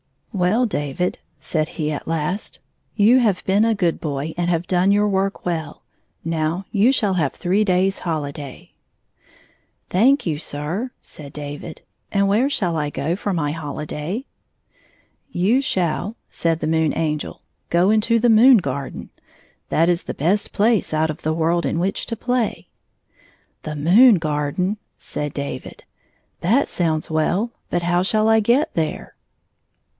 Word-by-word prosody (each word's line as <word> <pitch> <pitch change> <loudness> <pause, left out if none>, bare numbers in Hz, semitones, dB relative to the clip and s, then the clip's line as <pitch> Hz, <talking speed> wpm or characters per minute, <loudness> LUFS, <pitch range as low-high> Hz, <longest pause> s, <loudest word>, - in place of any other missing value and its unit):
'* - - -43
Well, 215 +8 +3
David," 165 - -2 0.2
said 155 -2 -1
he 155 -1 -1
at 145 - -5
last, 165 +5 -2 0.2
" - - -45
you 230 +5 +5
have 210 -7 +1
been 200 +3 +3
a 225 -1 +2
good 175 -5 0
boy 150 0 -3
and 175 0 -1
have 170 0 0
done 185 +2 +2
your 205 +1 +3
work 195 0 -1
well. 160 -4 -3 0.4
Now 165 +3 -1
you 215 +5 +4
shall 205 -8 +1
have 150 -6 0
three 190 +4 +1
days' 190 0 +1
hohday." 145 -4 -5 1.2
"Thank 255 +10 +4
you, 155 -4 -1
sir," 160 - -3
said 140 -2 -10
David. 145 +2 -7 0.3
"And 200 -1 +2
where 225 +8 +2
shall 185 - 0
I 150 -1 -1
go 155 +3 -2
for 200 +1 -2
my 150 -4 -1
hohday? 155 - -5 0.4
" - - -36
" - - -43
You 235 +8 +4
shall," 185 - -1 0.2
said 165 -1 -1
the - - -1
Moon 160 -1 +1
Angel, 155 -2 -2 0.3
"go 175 +4 +3
into 220 +2 +3
the 235 +1 +3
moon 235 +3 +7
garden. 140 -6 -4 0.6
That 165 +2 +3
is 175 -1 +1
the - - -5
best 185 +8 0
place 215 -4 +1
out 155 0 +1
of 150 - -10
the 155 - 0
world 165 +1 +1
in - - -1
which 185 +3 -1
to 230 - -3
play.." 245 0 -2 0.9
"The 155 -1 -5
moon 200 - +6
garden?" 155 +5 -1 0.2
said 150 -1 -5
David. 140 -2 -6 0.6
"That 230 +11 +2
sounds 160 -3 -1
well, 180 +9 0 0.2
but 175 0 -1
how 175 +1 +2
shall 215 +3 +2
I 220 0 +5
get 240 +7 +2
there 160 -2 -3
175 Hz, 160 wpm, -21 LUFS, 155-210 Hz, 1.2 s, moon